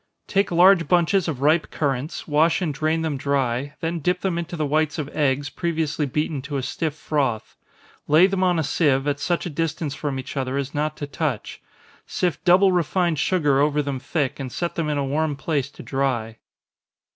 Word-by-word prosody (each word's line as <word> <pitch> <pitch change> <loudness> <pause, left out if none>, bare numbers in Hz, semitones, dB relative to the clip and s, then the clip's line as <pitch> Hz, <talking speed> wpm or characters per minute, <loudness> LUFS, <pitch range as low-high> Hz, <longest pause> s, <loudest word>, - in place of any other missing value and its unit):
_ - - -49
Take 195 0 +1
large 175 0 +5
bunches 180 +1 +2
of 140 -4 -3
ripe 155 +2 +3
currants, 140 0 -2
wash 155 +2 +3
and 170 -6 -1
drain 155 +3 0
them 155 -3 -1
dry, 140 0 -1
then 165 +1 -2
dip 180 +4 0
them 180 -3 -1
into 170 +1 -5
the 155 - 0
whites 155 +1 0
of 150 -3 -3
eggs, 145 -1 0
previously 160 -3 -1
beaten 150 +1 -2
to 140 +1 -4
a 135 - -3
stiff 145 +4 -2
froth. 140 -7 -2 0.5
Lay 155 +5 +6
them 190 -1 0
on 180 -2 +3
a 160 - +1
sieve, 140 -2 +1
at 145 0 0
such 175 +3 -1
a - - -3
distance 155 -1 -2
from 145 -2 -3
each 130 - -7
other 135 0 -2
as 140 0 -3
not 150 +1 -2
to 145 - -4
touch 145 -5 -3 0.5
sift 175 -3 -1
double 185 +2 +5
refined 175 -2 +1
sugar 150 -7 +2
over 150 +1 +2
them 140 -2 -3
thick, 135 0 -2
and 130 -2 -5
set 170 +6 -3
them 160 -2 -2
in 150 - 0
a 140 - 0
warm 150 +2 0
place 140 -1 -2
to - - -12
dry. 120 -5 -2
150 Hz, 205 wpm, -23 LUFS, 140-170 Hz, 0.5 s, Lay